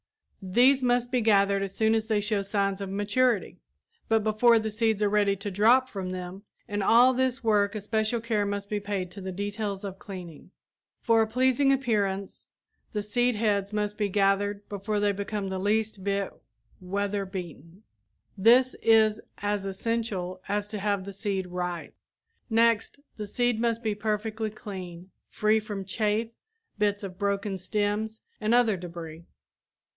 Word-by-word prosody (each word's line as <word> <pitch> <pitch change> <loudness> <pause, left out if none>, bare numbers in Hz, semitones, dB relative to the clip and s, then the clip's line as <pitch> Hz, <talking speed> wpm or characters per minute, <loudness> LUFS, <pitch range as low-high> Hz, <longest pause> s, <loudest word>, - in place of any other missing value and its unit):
These 245 +8 +4
must 245 -1 +1
be 250 -2 +2
gathered 200 -2 +3
as 195 0 -4
soon 220 0 +3
as 220 -1 0
they 215 -2 +2
show 210 -1 0
signs 195 0 -1
of 195 - -4
maturity 205 +2 0 0.5
but 225 -1 +3
before 220 +2 +4
the 220 -1 -1
seeds 220 -1 +1
are 205 - +3
ready 205 -1 +2
to 200 +1 -5
drop 235 +7 +4
from 195 -6 -5
them. 185 +1 -6 0.3
In 205 0 -2
all 240 +6 +6
this 260 0 0
work 205 -2 +2
especial 220 +2 -1
care 225 -2 0
must 200 0 -3
be 210 0 -2
paid 200 -3 -3
to 200 - -9
the 190 0 -5
details 205 +1 -4
of 195 -1 -6
cleaning. 180 -5 -9 0.5
For 230 -2 +4
a 220 - +2
pleasing 260 +4 +3
appearance 205 -7 -1 0.4
the 210 -1 -2
seed 245 +3 +1
heads 205 -2 0
must 210 -1 -1
be 205 -1 +1
gathered 200 +1 +1
before 205 +1 -2
they 205 0 +2
become 200 0 -3
the 190 0 -3
least 210 0 0
bit 200 0 -1 0.5
weather 200 +2 -2
beaten. 180 -1 -8 0.5
This 240 +6 +5
is 220 -1 +4 0.2
as 205 -1 -2
essential 195 -3 -3
as 205 0 -1
to 210 -1 -4
have 200 -1 -1
the 200 - -7
seed 195 -2 -2
ripe. 180 -1 -4 0.6
Next, 230 +2 +2 0.2
the 210 -1 -5
seed 240 +1 0
must 230 0 0
be 215 -1 0
perfectly 215 +1 -2
clean, 185 -4 -9 0.2
free 215 0 +2
from 205 -3 -6
chaff, 215 +3 0 0.5
bits 205 0 +1
of 185 -2 -7
broken 200 -1 -1
stems 210 +3 -2 0.2
and 215 +2 +2
other 235 -4 +4
debris. 170 -2 -8
205 Hz, 160 wpm, -27 LUFS, 195-220 Hz, 0.6 s, all